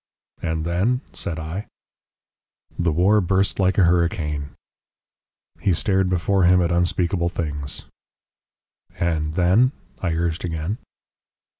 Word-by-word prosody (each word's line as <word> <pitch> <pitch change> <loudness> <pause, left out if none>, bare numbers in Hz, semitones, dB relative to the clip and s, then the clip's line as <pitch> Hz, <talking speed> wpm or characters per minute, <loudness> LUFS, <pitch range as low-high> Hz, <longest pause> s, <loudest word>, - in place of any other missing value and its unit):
"And 80 -1 -2
then?" 100 +10 +1
said 80 - -3
I. 80 +6 -5 1.1
"The 85 -1 +2
war 95 +7 +4
burst 95 +2 +1
like 95 -1 +2
a 100 - +5
hurricane." 85 -4 +1 1.1
He 95 - +2
stared 95 +1 +1
before 95 +2 +1
him 90 +1 +5
at 85 -1 +1
unspeakable 85 0 +1
things. 75 -4 -4 1.1
"And 80 -2 -1
then?" 95 +9 +4 0.3
I 85 -3 -1
urged 85 0 -1
again. 85 +5 -3
85 Hz, 115 wpm, -22 LUFS, 80-95 Hz, 1.1 s, a